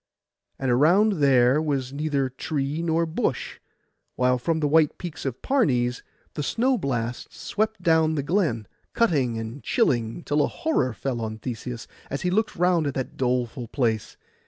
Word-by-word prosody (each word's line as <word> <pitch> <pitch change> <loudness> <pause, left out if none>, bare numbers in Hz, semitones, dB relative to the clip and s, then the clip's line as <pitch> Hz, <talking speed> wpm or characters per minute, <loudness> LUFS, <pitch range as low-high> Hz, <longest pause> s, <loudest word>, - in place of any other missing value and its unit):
And 135 -2 0
around 175 - +4
there 130 +1 +5
was 135 -4 -2
neither 140 -2 0
tree 140 +3 -3
nor 165 0 +1
bush, 160 0 -2 0.6
while 125 0 +2
from 160 +5 0
the 150 - +1
white 155 0 +3
peaks 170 -5 -7
of 130 -2 -5
Parnes 125 - +1 0.3
the - - -3
snow 250 - +1
blasts 120 -6 -3
swept 215 -2 -2
down 160 -1 +3
the 140 - -1
glen, 150 - 0 0.3
cutting 140 - +2
and 115 +5 -6
chilling 120 +4 0
till 145 +1 +1
a - - +2
horror 130 - 0
fell 125 +1 -3
on 110 -1 -4
Theseus 120 0 -6 0.2
as 140 - -4
he 180 - +1
looked 220 +4 0
round 175 -3 +2
at 140 - -3
that 130 - -4
doleful 125 -1 -1
place. 115 -4 -1
140 Hz, 160 wpm, -25 LUFS, 125-165 Hz, 0.6 s, there